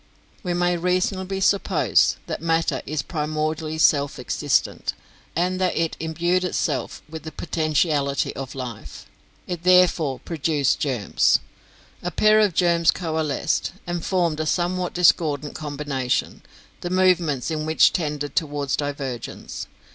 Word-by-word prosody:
"We 180 -2 -2
may 175 0 +1
reasonably 185 +2 0
suppose 200 +1 +3
that - - -5
matter 165 -4 +1
is 150 -1 -2
primordially 155 0 -2
self 145 -3 +3
existent, - - 0 0.4
and 185 +2 0
that 185 - +1
it 165 -1 0
imbued 170 +3 0
itself 180 - -2
with 160 +1 -8
the 160 - -8
potentiality 155 -4 0
of 135 0 -6
life. 115 - -7 0.4
It 175 -2 -5
therefore 180 -6 +4
produced 150 -4 0
germs. 125 -8 +2 0.6
A 175 - -2
pair 215 +5 +4
of 205 -6 +3
germs 170 -2 +3
coalesced, 160 -4 0
and 175 -1 -3
formed 170 -5 0
a 155 - -1
somewhat 180 +1 -1
discordant 155 -4 +2
combination, 140 -3 -2 0.4
the 175 - -4
movements 175 -7 +2
in 155 -1 -2
which 160 - +5
tended 150 -5 -2
towards 145 -4 0
divergence. 140 -4 -5
160 Hz, 125 wpm, -23 LUFS, 145-175 Hz, 0.6 s, which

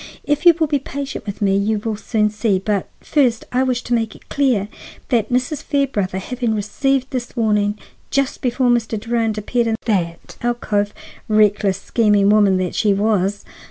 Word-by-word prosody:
If 295 +4 +1
you 340 - +8
will 320 - +4
be 290 -2 0
patient 275 -4 -6
with 200 +1 -4
me 195 -1 +3
you 210 +2 +1
will 215 +1 -3
soon 210 0 0
see; 210 -2 +1
but 200 0 -1
first 250 -7 +1
I 250 - +2
wish 255 -2 0
to 245 - -2
make 225 -2 0
it - - -19
clear 250 -8 +1 0.4
that 230 -4 +1
Mrs. 255 +4 0
Fairbrother, 250 -10 -1
having 235 +3 -2
received 260 +6 -1
this 250 -2 -4
warning 210 -3 +1 0.3
just 275 -1 -1
before 250 -1 +1
Mr. 225 -2 0
Durand 225 -1 -1
appeared 235 +3 0
in 225 - +1
the 175 -7 0 0.3
alcove,—reckless, 210 -3 0
scheming 205 -2 +3
woman 205 -3 +4
that 185 -1 -2
she 205 -2 +2
was! 200 -1 0
220 Hz, 170 wpm, -19 LUFS, 205-250 Hz, 0.4 s, you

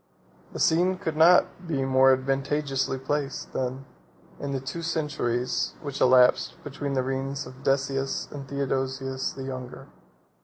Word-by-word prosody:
The - - -7
scene 180 +3 +3
could 165 -5 -3
not 175 +2 +4
be 140 -5 0
more 135 0 +5
advantageously 135 +1 0
placed, 140 +1 -3
than 130 +1 -3 0.5
in 140 - -4
the 135 - -1
two 135 +6 -5
centuries 145 -7 -1
which 140 -3 -6
elapsed 125 -1 +5
between 140 -1 -4
the 130 -1 +1
reigns 135 +1 -3
of 130 +1 -12
Decius 135 0 0
and 145 - -6
of 135 - -10
Theodosius 135 -1 -2
the 135 - -7
Younger. 130 - -7
135 Hz, 145 wpm, -26 LUFS, 130-145 Hz, 0.5 s, more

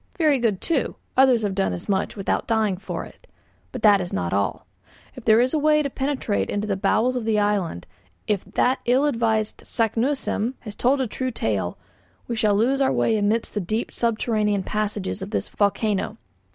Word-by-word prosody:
Very 305 -6 +3
good, 220 -6 0
too, 315 -6 -1 0.2
others 255 -3 +5
have 200 -2 0
done 190 - 0
as 90 - -7
much 195 -1 0
without 195 -2 -1
dying 220 -4 +1
for 195 - -5
it. - - -17 0.4
But 255 - -7
that 205 -3 +6
is 175 - -5
not 90 -1 -2
all. 100 -2 -1 0.5
If 255 - -11
there 220 0 +6
is 250 +2 +2
a 310 - +2
way 300 0 +3
to 280 - -3
penetrate 265 -6 -1
into 205 +1 -1
the 205 -2 -1
very - - -8
bowels 235 +6 +2
of 245 - -2
the 220 -1 +1
island, 205 - 0 0.4
if 205 -3 0
that 255 +1 +1
ill 255 +4 +3
advised 225 -5 0
Saknussemm 235 +1 0
has 210 -3 -8
told 265 +3 +2
a - - +1
true 255 +4 -3
tale, 100 - -2 0.5
we 235 - -2
shall 215 -2 +2
lose 255 +6 +2
our 265 - +3
way 225 - +2
amidst 215 +2 0
the 210 - -1
deep 215 +6 -2
subterranean 215 -3 0
passages 210 -1 -3
of 190 - -5
this - - -2
volcano. 210 +1 0
220 Hz, 195 wpm, -23 LUFS, 205-250 Hz, 0.5 s, that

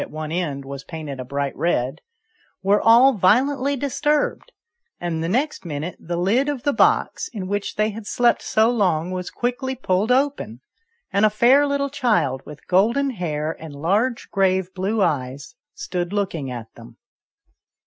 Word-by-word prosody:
85 - - -4
at - - -13
one 155 0 -4
end, 150 -6 -2
was 140 0 -7
painted 155 -5 -7
a - - -3
bright 140 +2 -3
red) 140 -4 -1 0.6
were 200 +2 +3
all 240 +4 +6
violently 260 +8 +2
disturbed, 295 - -1 0.5
and 165 -2 -2
the 165 - -2
next 270 +9 -1
minute 160 +1 -5
the 170 +1 -4
lid 225 +11 +2
of 280 -4 -3
the 285 - +1
box, - - +2
in 205 -5 -6
which 205 +1 -3
they 215 +1 +1
had 210 0 -9
slept 240 +1 +2
so 220 +2 +2
long, 180 -7 +1
was 180 -1 -4
quickly 255 +2 -2
pulled 210 -2 0
open, 265 - 0 0.5
and 200 - +2
a 215 - +6
fair 250 +7 +4
little 280 -1 -1
child 215 - +1
with 150 -1 -12
golden 235 +9 +2
hair 160 -7 -3
and 155 -3 -9
large 205 - 0
grave 190 -2 +1
blue 200 +3 0
eyes 135 -4 -2 0.2
stood 180 - -3
looking 185 -9 -2
at 120 -3 -7
them. - - -14
195 Hz, 170 wpm, -22 LUFS, 160-245 Hz, 0.6 s, all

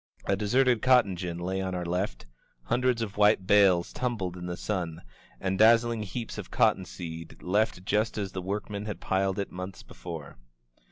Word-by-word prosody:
A 100 - +2
deserted 120 +3 +2
cotton 125 -7 +4
gin 85 -1 -4
lay 95 +2 -2
on 95 -1 -2
our 90 -1 -3
left, 85 -9 -2 0.4
hundreds 125 - +1
of 105 -2 -6
white 105 -2 +4
bales 95 -4 +4
tumbled 110 -8 -2
in 90 0 -6
the 90 0 -4
sun, 85 -6 -3 0.4
and 95 0 -1
dazzling 115 +1 +5
heaps 110 +3 -5
of - - -7
cotton 95 - +2
seed 85 -2 -8
left 95 -1 0
just 105 +3 +1
as 100 -3 -2
the 95 - -4
workmen 100 +2 -4
had 105 - -5
piled 95 0 0
it 100 - -3
months 90 +1 -7
before. 80 -5 -9
95 Hz, 175 wpm, -28 LUFS, 90-110 Hz, 0.4 s, dazzling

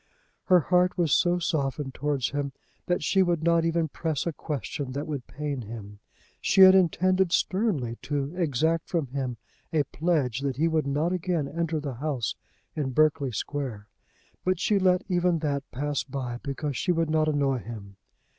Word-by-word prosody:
Her 180 -2 +5
heart 180 +4 +2
was 170 -4 +1
so 175 0 +3
softened 140 -5 -1
towards 145 -2 -1
him 140 -1 -2 0.3
that 175 - 0
she 195 - +3
would 175 -3 +1
not 170 0 +3
even 165 -1 +1
press 155 -1 -2
a 170 - -1
question 145 - -4
that 145 +2 -3
would 140 -5 -5
pain 145 -2 -4
him. 105 -2 -9 0.4
She 195 - +4
had 190 0 +10
intended 185 0 +3
sternly 170 - 0
to 145 +2 -3
exact 160 -1 0
from 165 -5 0
him 130 -2 -3 0.3
a 155 -2 +2
pledge 145 -5 0
that 135 -2 -2
he 160 +3 +3
would 160 -3 0
not 150 +6 0
again 175 -4 -1
enter 165 +1 -2
the 145 -3 -4
house 135 -2 -2 0.4
in 135 -4 -2
Berkeley 150 -2 +3
Square, 115 -4 -4 0.5
but 185 -1 +1
she 205 0 +2
let 185 0 +3
even 180 -2 +2
that 140 -3 -2
pass 145 +1 -2
by 125 -2 -5
because 140 0 -3
she 180 - 0
would 165 -2 0
not 155 0 +2
annoy 140 -3 +1
him. 105 -4 -9
150 Hz, 175 wpm, -27 LUFS, 135-170 Hz, 0.5 s, had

